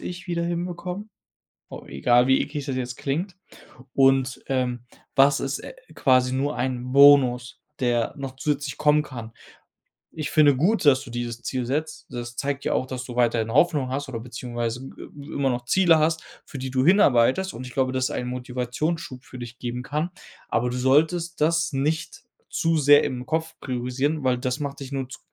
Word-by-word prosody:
ich 180 +1 -7
wieder 170 -1 -1
hinbekommen?“ 180 +4 -4 0.6
W - - -9
egal, 120 - +3
wie 130 0 +4
eklig 145 -1 -5
das 135 -3 -3
jetzt 125 -1 -4
klingt 170 +7 -3 0.6
und, 135 -1 +3
ähm: 125 -3 -1 0.3
„Was 140 +1 +5
ist, 135 0 -2
äh, - - -9 0.2
quasi 130 -1 +3
nur 140 +3 -1
ein 125 0 -2
Bonus, 130 -3 +5 0.2
der 120 -2 +1
noch 135 -2 -6
zusätzlich 145 0 -2
kommen 150 0 +4
kann?“ 120 -6 -8 0.9
Ich 155 -2 -3
finde 145 -4 +5
gut, 180 - +1
dass 135 -2 +5
du - - -11
dieses 120 0 -4
Ziel 130 -2 -2
setzt. 150 +5 -3
Das 120 -1 -6
zeigt 140 0 -2
ja - - +1
auch, - - 0
dass 130 -1 -5
du 125 -2 -8
weiterhin 115 -2 +1
Hoffnung 145 -1 +3
hast 140 +2 -3
oder 115 -3 -4
beziehungsweise 120 +1 -5
ge - - -11
i 145 -1 -11
immer 135 -1 +1
noch 120 -1 -2
Ziele 170 +3 +4
hast, 160 +1 +1 0.2
für 145 - -9
die 130 0 -5
du 130 0 +1
hinarbeitest 175 - +4
und 130 +2 -7
ich 125 - -11
glaube, 130 -1 +1
dass 130 -1 0
es - - -1
ein 125 - -3
Motivationsschub 125 +3 -3
für 125 - -10
dich 120 0 -9
geben 125 0 -4
kann, 150 +5 -2 0.4
aber 120 +2 +1
du 125 - -3
solltest 160 +6 +2
das 165 0 +2
nicht 150 +4 -2 0.3
zu 165 -1 +1
sehr 145 0 +6
im 125 -1 -3
Kopf 160 +2 -2
priorisieren, 130 +4 -2
weil 130 -1 +2
das 125 +2 -2
macht 140 -1 -4
dich 135 0 -8
nur 135 -2 -3
z - - -10
135 Hz, 190 wpm, -24 LUFS, 125-150 Hz, 0.9 s, sehr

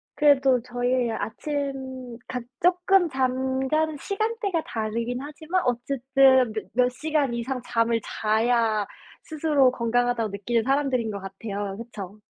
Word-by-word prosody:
그래도 270 -4 +4
저희 245 0 0
아침 260 0 -4
각 250 -1 -4 0.2
조금 360 +1 +4
잠자는 265 +3 0
시간대가 405 - -1
다르긴 230 +3 -3
하지만 315 +5 -2
어쨌든 260 0 +3
몇 215 0 -4
몇 250 +1 +4
시간 290 0 -1
이상 250 +2 -3
잠을 230 -1 +1
자야 220 -1 +1 0.4
스스로 300 -4 +2
건강하다고 240 -2 0
느끼는 220 +4 -1
사람들인 270 -4 +1
것 200 -1 -5
같아요. 195 +1 -5
그쵸? 215 -4 -8
255 Hz, 275 characters per minute, -25 LUFS, 230-285 Hz, 0.4 s, 그래도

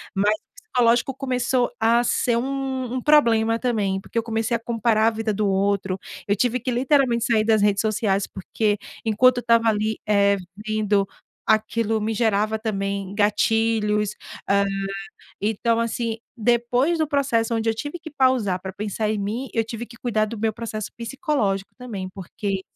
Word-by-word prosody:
mas 205 +2 +3
o 360 - -12
psicológico 240 0 +3
começou 255 -2 0
a 230 +2 +4
ser 240 0 +1
um 270 +2 -2 0.2
um 255 0 -2
problema 230 -6 +4
também. 205 -6 0
Porque 230 - -8
eu 230 - +2
comecei 225 0 -1
a - - -15
comparar 230 -1 +1
a - - +7
vida 220 0 -2
do 210 0 0
outro, 195 -1 0 0.3
eu 205 - +2
tive 245 +4 +1
que 250 +2 -2
literalmente 250 -2 +2
sair 225 -2 +3
das 220 -1 +3
redes 200 -1 +3
sociais, 210 -3 0
porque 205 +2 -1 0.3
enquanto 245 +3 +4
eu - - 0
estava 230 -1 +3
ali, 215 0 0
eh, 200 -1 +4 0.3
vendo 210 -2 +1 0.4
aquilo, 220 0 +1
me 220 +1 -1
gerava 215 -1 +1
também 200 -3 -3
gatilhos. 210 0 +2 0.4
Ah, 200 0 +3 0.8
então, 225 +2 +1
assim, 230 -1 -2 0.2
depois 245 +7 +2
do 315 -2 +1
processo 240 -6 +1
onde 225 0 -1
eu - - -2
tive 290 +9 -5
que 320 - -9
pausar 255 -10 +2
pra 190 - -5
pensar 210 +2 -2
em 215 - -1
mim, 220 +7 -3
eu 225 - +1
tive 230 +1 -6
que 235 - -14
cuidar 220 -3 0
do 225 +1 -6
meu 220 +1 0
processo 215 -2 -5
psicológico 230 - -1
também, 210 -7 -5
porque 195 +1 -4
225 Hz, 170 wpm, -23 LUFS, 210-240 Hz, 0.8 s, a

